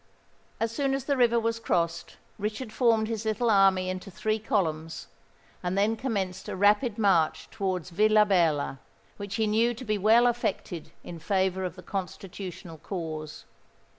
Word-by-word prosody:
As 225 0 0
soon 270 +3 0
as 270 - -3
the 285 - +1
river 235 -2 +3
was 230 0 -1
crossed, 170 -6 -1 0.2
Richard 215 +3 -4
formed 225 -3 +3
his 225 -1 -3
little 220 +2 +1
army 195 -2 +4
into 185 +1 -5
three 215 +3 -1
columns, 165 - -2 0.6
and 180 +2 -2
then 210 +3 +2
commenced 195 -6 -3
a - - -4
rapid 205 +4 +3
march 190 -7 +2
towards 185 -5 -3
Villabella, 185 -8 +3 0.4
which 200 0 -5
he 220 - +1
knew 225 +3 +2
to 255 +3 -9
be 215 -2 0
well 225 +4 +5
affected 200 -8 -2
in 170 -1 -8
favour 190 +1 0
of 180 -2 -4
the 180 - -12
Constitutional 180 -2 -6
cause. 155 -5 -6
205 Hz, 155 wpm, -27 LUFS, 180-225 Hz, 0.6 s, well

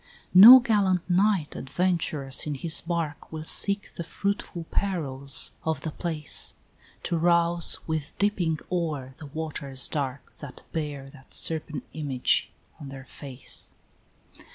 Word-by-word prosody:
VI. - - -30 0.3
No 225 +8 +11
gallant 200 -7 0
knight, 190 -3 +1
adventurous, 155 -4 -2
in 150 - -3
his 155 +3 +1
bark, 165 -3 -4
Will 155 -1 -6
seek 200 +5 +1
the 170 - -6
fruitful 190 0 -4
perils 140 -8 0
of 160 -3 -2
the 160 - -5
place, 155 -1 -3 0.5
To 170 - -2
rouse 170 0 +4
with 160 -2 -4
dipping 185 -6 0
oar 155 -7 -3
the 150 - -9
waters 145 -3 -2
dark 140 -3 -5
That 140 -4 -10
bear 145 -4 -5
that 135 -2 -10
serpent 155 -4 +1
image 140 -4 0 0.3
on 145 -3 -9
their 135 -1 -10
face. 135 -3 -6
160 Hz, 130 wpm, -26 LUFS, 140-175 Hz, 0.5 s, No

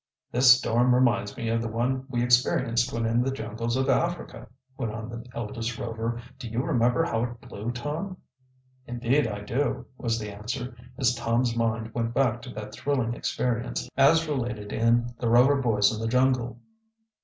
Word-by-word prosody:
"This 125 0 +7
storm 125 0 +3
reminds 120 -5 +2
me 115 - -3
of 115 0 +1
the 115 - -2
one 125 +4 -1
we 120 -2 0
experienced 120 0 +2
when 115 -1 -1
in 115 +2 +2
the 130 - 0
jungles 115 -1 -3
of 130 - +1
Africa," 175 +1 -1 0.3
went 120 -5 -3
on 110 +1 -6
the 120 -1 -7
eldest 115 0 -4
Rover. 115 0 -3 0.2
"Do 120 - -6
you 115 +3 -1
remember 125 -2 +2
how 115 -9 0
it 120 -1 -8
blew, 120 -2 -6
Tom?" 150 +10 -4 0.7
"Indeed 120 +3 +1
I 105 -2 -5
do," 120 +8 -1
was 115 -2 0
the 105 -2 -5
answer, 120 +4 -5 0.2
as 125 -2 +3
Tom's 120 0 0
mind 115 -1 -1
went 115 0 -2
back 120 -4 +2
to 125 - -9
that 105 0 -7
thrilling 130 -3 -1
experience, 120 0 -2
as 155 +4 +5
related 120 -7 -3
in 120 +1 +2
"The 120 - 0
Rover 130 +4 +5
Boys 110 -4 +3
in 110 - -5
the 115 - -1
Jungle." 125 0 +1
120 Hz, 180 wpm, -27 LUFS, 115-125 Hz, 0.7 s, This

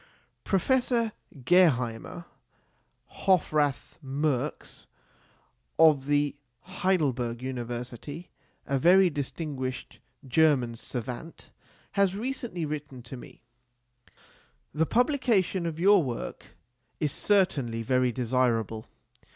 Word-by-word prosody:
Professor 235 +3 +1 0.3
Geheimer 145 -3 +2 0.9
Hofrath 150 -6 +1
Merx, 140 0 -3 0.9
of 155 -4 +5
the 145 -1 +1 0.3
Heidelberg 140 -11 -1
University, 125 +5 -6 0.3
a 135 -1 0
very 180 +4 +5
distinguished 140 -3 -5 0.3
German 130 -4 +3
savant, 125 +7 -7 0.4
has 195 -2 +2
recently 230 -6 -3
written 145 -4 -6
to 125 +2 -9
me: 120 - -13 1.3
The 160 +1 +1
publication 235 - +1
of 160 -1 -5
your 200 +2 +6
work 125 -6 -6 0.4
is 150 -2 0
certainly 140 - +1
very 125 +1 +2
desirable. 115 -3 0
145 Hz, 85 wpm, -28 LUFS, 125-180 Hz, 1.3 s, your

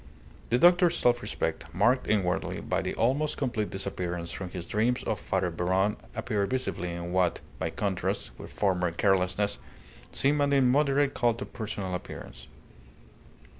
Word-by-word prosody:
The 120 - +3
doctor's 175 +3 +5
self 120 0 +3
respect - - -3
marked 120 +7 +3
inwardly 95 -3 0
by - - -1
the - - -3
almost 145 +6 +1
complete 120 -6 -1
disappearance 90 -3 -3
from 95 -2 -5
his 90 -1 -6
dreams 120 +4 0
of 105 - -1
Father 95 -2 -1
Beron 95 +5 +1 0.2
appeared 105 -4 -1
visibly 125 -9 -2
in 85 0 -5
what, 90 -2 +2 0.2
by - - -1
contrast 95 -10 -2
with - - -9
former 90 -3 +1
carelessness, 95 +3 +1 0.5
seemed 145 +2 +2
an 140 0 +2
immoderate 140 +1 +3
cult 120 -1 +1
of - - -12
personal 100 -4 -4
appearance. 60 -8 -7
100 Hz, 145 wpm, -28 LUFS, 90-125 Hz, 0.5 s, doctor's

